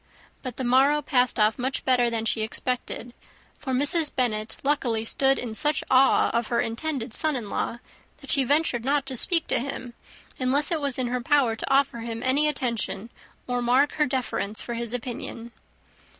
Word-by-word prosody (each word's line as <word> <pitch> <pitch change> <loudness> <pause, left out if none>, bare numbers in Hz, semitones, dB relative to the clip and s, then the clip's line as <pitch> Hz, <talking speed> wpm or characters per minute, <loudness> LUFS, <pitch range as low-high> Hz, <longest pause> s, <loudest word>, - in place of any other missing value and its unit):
But 255 -3 -7
the 260 - -3
morrow 270 +4 +3
passed 250 -4 +1
off 215 +2 +2
much 260 +2 -2
better 250 -2 +3
than 225 -1 -2
she 225 0 0
expected; 240 +2 -3 0.4
for 265 - -6
Mrs. 290 +4 +2
Bennet 215 -4 -1
luckily 245 -6 0
stood 270 +3 +2
in 235 -3 -4
such 295 +6 +1
awe 265 +1 +4
of 235 -1 -1
her 235 - 0
intended 245 0 -3
son 310 +1 +2
in 225 -5 -5
law, 235 - -2 0.4
that - - -8
she 275 -4 +3
ventured 280 -3 +1
not 280 +2 +1
to 265 -1 -5
speak 330 +6 +4
to - - +2
him, 255 -2 -5 0.5
unless 275 +4 +1
it 325 -2 0
was 280 -3 -1
in 255 - 0
her 245 +1 -2
power 265 -4 +2
to 225 - -5
offer 270 -3 +2
him 230 0 -5
any 280 +4 +3
attention, 235 -6 -2 0.3
or 245 0 -2
mark 255 +4 +3
her 300 -1 +1
deference 250 -5 -2
for 240 - -5
his 235 -1 -3
opinion. 240 -1 -6
255 Hz, 185 wpm, -25 LUFS, 235-280 Hz, 0.5 s, awe